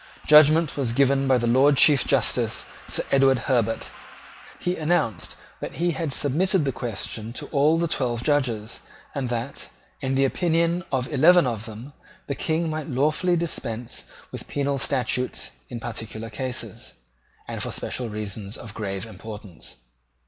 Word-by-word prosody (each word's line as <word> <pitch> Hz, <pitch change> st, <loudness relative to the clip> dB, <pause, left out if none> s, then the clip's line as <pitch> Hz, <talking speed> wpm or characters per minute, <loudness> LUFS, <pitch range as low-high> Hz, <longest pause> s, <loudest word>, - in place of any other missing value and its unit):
Judgment 155 Hz, +1 st, +6 dB
was 125 Hz, -5 st, 0 dB
given 135 Hz, +1 st, +3 dB
by 130 Hz, -1 st, +5 dB
the 120 Hz, -, -1 dB
Lord 135 Hz, +4 st, +4 dB
Chief 145 Hz, -2 st, +7 dB
Justice, 120 Hz, -3 st, +1 dB, 0.2 s
Sir -, -, +1 dB
Edward 135 Hz, -1 st, +5 dB
Herbert. 115 Hz, -3 st, 0 dB, 0.7 s
He 180 Hz, 0 st, -1 dB
announced 150 Hz, -, 0 dB, 0.2 s
that -, -, -6 dB
he 175 Hz, +1 st, +1 dB
had 160 Hz, -2 st, -3 dB
submitted 160 Hz, +6 st, +2 dB
the 135 Hz, -, +1 dB
question 115 Hz, -1 st, -4 dB
to -, -, -4 dB
all 150 Hz, +2 st, +4 dB
the 170 Hz, 0 st, +1 dB
twelve 120 Hz, -6 st, 0 dB
Judges, 125 Hz, -7 st, 0 dB, 0.3 s
and 135 Hz, -3 st, -2 dB
that, 120 Hz, +3 st, -4 dB, 0.3 s
in 135 Hz, -1 st, -1 dB
the 135 Hz, +1 st, +4 dB
opinion 170 Hz, +3 st, +1 dB
of 130 Hz, -2 st, 0 dB
eleven 170 Hz, +4 st, +6 dB
of 115 Hz, -3 st, -3 dB
them, 115 Hz, +6 st, -9 dB, 0.3 s
the 140 Hz, -, -2 dB
King 160 Hz, +4 st, -1 dB
might 155 Hz, -1 st, -4 dB
lawfully 155 Hz, +7 st, +1 dB
dispense 120 Hz, -8 st, -4 dB, 0.3 s
with -, -, -7 dB
penal 140 Hz, -1 st, -1 dB
statutes 125 Hz, -1 st, -1 dB, 0.2 s
in 120 Hz, -, -5 dB
particular 115 Hz, -1 st, -6 dB
cases, 130 Hz, +2 st, -5 dB, 0.5 s
and -, -, -4 dB
for -, -, -2 dB
special 125 Hz, -3 st, -4 dB
reasons 105 Hz, -1 st, -5 dB
of 110 Hz, -2 st, -8 dB
grave 100 Hz, -2 st, -4 dB
importance. 105 Hz, -, -9 dB
130 Hz, 150 wpm, -24 LUFS, 115-150 Hz, 0.7 s, Chief